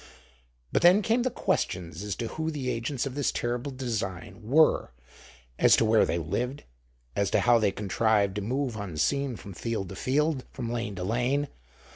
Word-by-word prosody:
But - - +2
then 180 +5 +6
came 230 +4 +2
the 255 - +1
questions 90 - -2
as 105 -2 -3
to 115 - -4
who 160 0 -3
the 135 -5 -2
agents 120 +3 -2
of 135 - -4
this 145 0 0
terrible 120 +3 -2
design 100 -7 -4
were, 140 +9 +3 0.7
as - - +7
to 115 - +2
where 110 0 +4
they - - 0
lived, 125 - -3 0.5
as 100 -1 +1
to - - +2
how 120 -1 +5
they 105 -3 +2
contrived 100 0 +1
to - - -1
move 125 +3 -2
unseen 110 - -1
from 100 -2 -10
field 100 +2 -3
to 95 - -7
field, 140 +4 0
from 120 -3 -5
lane 115 -4 -3
to 90 - -4
lane. 125 +8 0
115 Hz, 180 wpm, -28 LUFS, 100-140 Hz, 0.7 s, as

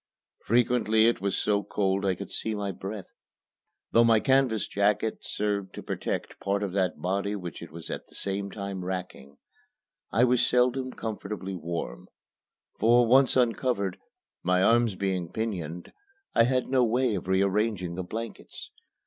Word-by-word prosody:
Frequently 115 -2 +3
it 115 -3 +2
was 100 -1 0
so 100 -1 +1
cold 100 -1 0
I 95 - +2
could - - -8
see 110 -1 -3
my 100 -1 -2
breath. 95 +2 -7 0.8
Though 115 - +6
my 115 -1 +5
canvas 130 -4 +2
jacket 105 +2 +1
served 100 -2 -2
to - - -7
protect - - -4
part 100 +1 -1
of 100 - -2
that 95 -2 0
body 100 +3 -1
which 90 -5 -7
it - - -9
was 85 0 -8
at - - -6
the - - -15
same 100 0 -3
time 100 -2 -5
racking, 90 -7 -6 0.7
I 115 - +3
was 125 -1 +4
seldom 125 +1 +2
comfortably 105 -4 -5
warm; 85 -8 -5 0.7
for, 120 +2 +5
once 130 +2 +5
uncovered, 120 -6 +1 0.4
my 90 +1 +2
arms 115 -1 +4
being 95 -3 -2
pinioned, 90 -7 -4 0.4
I 115 - +5
had 130 0 +1
no 130 -1 +3
way 120 +1 +2
of 95 -3 -4
rearranging 95 -1 +1
the 90 +1 -4
blankets. 115 +5 -7
100 Hz, 155 wpm, -27 LUFS, 95-115 Hz, 0.8 s, Though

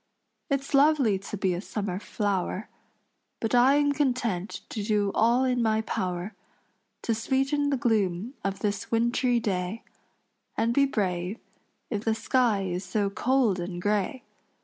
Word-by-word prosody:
It's 275 0 -1
lovely 275 -8 +4
to 200 +2 -6
be 190 -2 +1
a 175 - -3
summer 200 -3 -3
flower, 200 -1 -2 0.7
But 225 - -2
I 250 +3 +6
am 290 0 +3
content 245 -9 -1
to 215 - -4
do 205 -1 +1
all 235 +3 +3
in 250 -2 +1
my 220 -1 +2
power 185 -1 -3 0.7
To 230 - +1
sweeten 270 +5 0
the 275 - +1
gloom 215 -2 0
of 195 0 -3
this 205 -2 -2
wintry 235 +1 +2
day, 195 0 -2 0.7
And 230 +1 +2
be 275 +2 +4
brave 185 -4 -1 0.5
if 210 -2 -2
the 225 -1 +1
sky 230 -5 +2
is 180 0 -3
so 200 +1 -1
cold 245 -4 +2
and 175 0 -4
gray. 205 +6 -1
220 Hz, 150 wpm, -27 LUFS, 195-250 Hz, 0.7 s, I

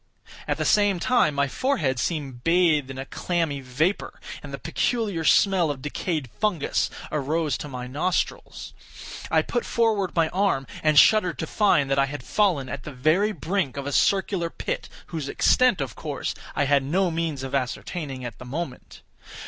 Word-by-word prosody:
At - - 0
the - - -1
same 205 -3 +3
time 175 - +2
my 140 0 +2
forehead 150 - 0
seemed 135 -7 -3
bathed 165 -5 +3
in 135 - -7
a 135 - -5
clammy 165 -2 -2
vapor, 140 +9 -1 0.2
and - - -9
the - - -4
peculiar 210 -9 -1
smell 185 -1 +4
of 140 -3 -4
decayed 150 -1 -2
fungus 205 -8 0 0.2
arose 150 +1 0
to - - -6
my 125 -3 -6
nostrils. 155 +8 -2 0.6
I - - +3
put 240 - -2
forward 220 -5 0
my 165 -2 +3
arm, 185 -8 +1 0.2
and 155 -1 +2
shuddered 180 -1 +5
to - - -3
find 175 -6 +2
that 135 - +3
I 135 - +3
had 140 -2 -6
fallen 175 -10 +1
at 130 +1 -5
the 150 - -8
very 155 +11 +2
brink 165 - -2
of 140 - -4
a 145 - -3
circular 190 +1 +1
pit, - - -4 0.2
whose 150 -4 -3
extent, 250 - +3
of 130 -6 -4
course, - - -4 0.2
I - - +2
had 140 0 +3
no 175 +7 +1
means 160 -4 -2
of 135 - -6
ascertaining 135 +1 -3
at 115 -3 -7
the 125 - -9
moment. 135 0 -6
155 Hz, 175 wpm, -25 LUFS, 135-185 Hz, 0.6 s, shuddered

